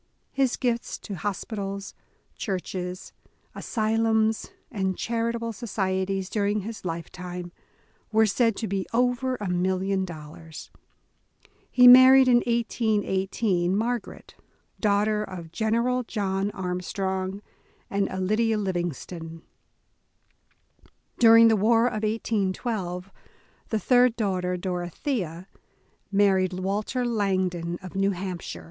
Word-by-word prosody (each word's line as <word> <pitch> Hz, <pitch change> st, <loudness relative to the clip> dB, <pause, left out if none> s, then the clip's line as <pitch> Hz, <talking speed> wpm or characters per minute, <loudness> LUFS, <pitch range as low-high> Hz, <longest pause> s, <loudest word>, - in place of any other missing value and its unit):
His 270 Hz, -3 st, +1 dB
gifts 240 Hz, -2 st, -1 dB
to 205 Hz, -, -8 dB
hospitals, 200 Hz, +1 st, -4 dB, 0.4 s
churches, 185 Hz, -2 st, -4 dB, 0.4 s
asylums, 220 Hz, +1 st, 0 dB, 0.2 s
and 190 Hz, -5 st, -1 dB
charitable 230 Hz, 0 st, -2 dB
societies 190 Hz, -3 st, -2 dB
during 205 Hz, +1 st, 0 dB
his 220 Hz, +3 st, -7 dB
lifetime, 175 Hz, +1 st, -6 dB, 0.6 s
were 220 Hz, 0 st, +4 dB
said 225 Hz, +1 st, +2 dB
to 220 Hz, -, -3 dB
be 195 Hz, 0 st, -2 dB
over 250 Hz, +1 st, +1 dB
a 210 Hz, -5 st, -5 dB
million 190 Hz, +2 st, 0 dB
dollars. 160 Hz, -2 st, -9 dB, 1.0 s
He 250 Hz, -1 st, +6 dB
married 260 Hz, +1 st, +9 dB
in 245 Hz, -1 st, +6 dB
1818, 205 Hz, -5 st, 0 dB
Margaret, 235 Hz, 0 st, -3 dB, 0.5 s
daughter 210 Hz, 0 st, +2 dB
of 175 Hz, -5 st, -8 dB
General 235 Hz, +5 st, +1 dB
John 200 Hz, -4 st, -2 dB
Armstrong 190 Hz, +1 st, -3 dB, 0.4 s
and 200 Hz, 0 st, -1 dB
Alida 215 Hz, +4 st, +1 dB
Livingston. 175 Hz, -3 st, -4 dB, 1.8 s
During 230 Hz, -1 st, +8 dB
the 225 Hz, -, +5 dB
war 225 Hz, +3 st, +3 dB
of 215 Hz, -3 st, -1 dB
1812, 200 Hz, -3 st, -2 dB, 0.6 s
the 220 Hz, -, 0 dB
third 245 Hz, 0 st, +4 dB
daughter, 185 Hz, -5 st, -1 dB
Dor 180 Hz, 0 st, -3 dB
othea, 175 Hz, -, -4 dB, 0.7 s
married 190 Hz, -2 st, +3 dB
Walter 205 Hz, +7 st, -2 dB
Langdon 185 Hz, -6 st, -1 dB
of 185 Hz, -, -8 dB
New 195 Hz, 0 st, +1 dB
Hampshire. 185 Hz, -2 st, -5 dB
200 Hz, 100 wpm, -26 LUFS, 185-225 Hz, 1.8 s, married